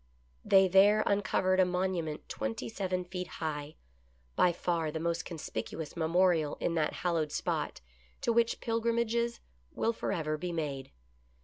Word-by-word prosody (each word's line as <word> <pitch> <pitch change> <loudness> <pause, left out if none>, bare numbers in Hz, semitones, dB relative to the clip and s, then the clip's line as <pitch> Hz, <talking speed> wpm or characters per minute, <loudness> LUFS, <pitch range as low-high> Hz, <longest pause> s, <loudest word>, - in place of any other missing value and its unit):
They 190 -1 +6
there 200 +3 +6
uncovered 190 -2 +2
a - - +7
monument 180 -4 -2
twenty 110 +3 -3
seven 185 - -2
feet 180 0 -5
high, 150 -1 -4 0.6
by 180 - +4
far 170 -2 -1
the 160 +1 -4
most 170 +1 -1
conspicuous 160 -1 -5
memorial 165 -2 +2
in 170 - 0
that 160 -2 +1
hallowed 165 -4 +1
spot, - - -2 0.4
to 235 - +1
which 230 0 +2
pilgrimages 235 0 0 0.3
will 230 - +1
forever 155 -8 -2
be 180 +2 -3
made. 140 -5 -3
175 Hz, 135 wpm, -31 LUFS, 160-195 Hz, 0.6 s, a